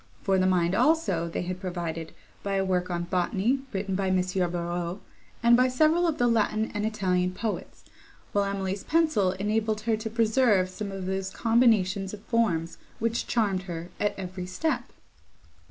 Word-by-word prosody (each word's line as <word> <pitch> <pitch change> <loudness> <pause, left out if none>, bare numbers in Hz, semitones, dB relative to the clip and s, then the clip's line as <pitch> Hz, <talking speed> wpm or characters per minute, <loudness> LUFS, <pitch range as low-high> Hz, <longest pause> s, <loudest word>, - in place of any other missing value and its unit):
For 195 -1 +2
the 185 - +3
mind, 175 -1 +2
also, 215 - +2
they 165 - -3
had 180 +1 -4
provided, 170 -3 -4 0.3
by 200 -1 -2
a 195 0 +1
work 180 -1 0
on 175 -1 -1
botany, 190 +8 0
written 195 -1 -2
by 190 0 0
M. 185 - +2
Barreaux, 175 -1 -1 0.4
and 235 0 +7
by 255 +1 +4
several 310 +7 +3
of 320 -2 0
the 245 - +2
Latin 220 -1 +1
and 210 0 -1
Italian 185 -4 0
poets; 220 +1 -4 0.5
while 200 0 +2
Emily's 195 0 -2
pencil 310 - +2
enabled 215 +2 -1
her 225 0 +1
to 220 +1 -4
preserve 220 -4 +3
some 200 +2 -5
of 195 -1 -5
those 190 0 -2
combinations 210 -4 +2
of 205 - -16
forms, 175 -9 0 0.2
which 230 +1 -1
charmed 205 -5 +1
her 170 +1 -6
at 205 - 0
every 185 -1 -5
step. 245 - -1
195 Hz, 170 wpm, -27 LUFS, 185-225 Hz, 0.5 s, and